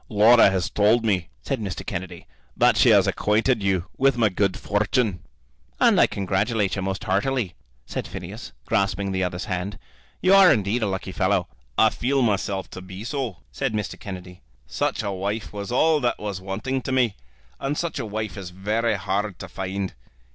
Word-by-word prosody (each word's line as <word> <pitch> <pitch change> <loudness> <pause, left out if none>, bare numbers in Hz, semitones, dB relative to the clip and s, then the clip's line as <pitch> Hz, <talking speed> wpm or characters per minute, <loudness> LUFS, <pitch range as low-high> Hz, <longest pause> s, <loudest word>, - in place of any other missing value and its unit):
"Laura 110 +1 +6
has 95 -3 0
told 110 +3 +3
me," 95 -6 +1
said 135 -3 -2
Mr. 100 -4 -5
Kennedy, 90 -3 -5 0.3
"that - - +5
she - - +5
has - - +6
acquainted 110 +3 +1
you 95 -3 +1
with 135 -2 +3
my 110 -3 +4
good 100 0 0
fortune." 105 -1 0 0.6
"And - - +5
I - - +6
congratulate 100 +1 0
you 100 - -3
most 95 0 -3
heartily," 100 0 0 0.3
said - - -4
Phineas, - - -8
grasping 100 0 0
the 95 0 0
other's 90 +1 -3
hand. 95 -1 -3 0.4
"You 185 - +4
are 195 -3 +8
indeed 110 -1 +1
a 110 - +1
lucky 95 -1 -3
fellow." - - +1 0.3
"I - - +5
feel 135 +2 +1
myself 100 -3 0
to 95 - -8
be 95 +2 -9
so," 120 -5 -4
said 135 -4 -2
Mr. 105 -1 -3
Kennedy. 90 -2 -8 0.2
"Such - - -1
a 100 - -2
wife 100 +4 -3
was 100 +2 -5
all 155 +5 +4
that 120 -3 0
was 100 -3 -5
wanting 110 +8 -3
to 130 - -4
me, 125 -6 +2 0.4
and 140 +2 -2
such 170 -2 -2
a - - -3
wife 110 +1 -4
is 95 -3 -6
very 105 +5 0
hard 100 +1 -2
to - - -8
find. 95 0 -4
100 Hz, 185 wpm, -24 LUFS, 95-120 Hz, 0.6 s, are